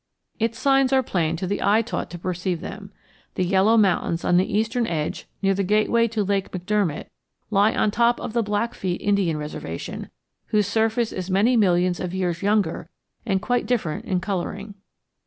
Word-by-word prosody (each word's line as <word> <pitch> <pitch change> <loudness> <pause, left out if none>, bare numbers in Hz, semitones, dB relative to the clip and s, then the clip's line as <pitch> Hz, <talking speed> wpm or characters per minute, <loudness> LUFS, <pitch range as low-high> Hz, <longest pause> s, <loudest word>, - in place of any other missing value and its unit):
Its 230 0 0
signs 270 0 +3
are 265 -1 +4
plain 170 -7 0
to 180 +3 -4
the 200 +2 -2
eye 215 +3 +3
taught 240 - -4
to 175 - -7
perceive 180 0 -2
them. 200 +2 -8 0.4
The 185 - 0
yellow 195 +5 +4
mountains 185 -5 +1
on 175 - +4
the 185 - +1
eastern 225 +3 0
edge 155 -2 -3 0.2
near 195 0 +3
the 195 - -1
gateway 215 +4 +2
to 220 -2 -1
Lake 195 -1 -1
McDermott 185 -3 -1 0.5
lie 205 +1 +3
on 215 - +2
top 235 +2 +2
of - - -5
the 235 - +2
Blackfeet 205 -4 -2
Indian 200 -6 +1
Reservation, 150 - -6 0.4
whose 210 -1 +2
surface 225 +3 +1
is 185 0 -5
many 205 +7 +3
millions 180 -4 +2
of 180 0 -4
years 175 -3 -1
younger 200 -5 0 0.4
and 190 -2 0
quite 245 0 0
different 215 -11 -1
in 185 - 0
coloring. 200 +2 -4
200 Hz, 175 wpm, -23 LUFS, 180-220 Hz, 0.5 s, are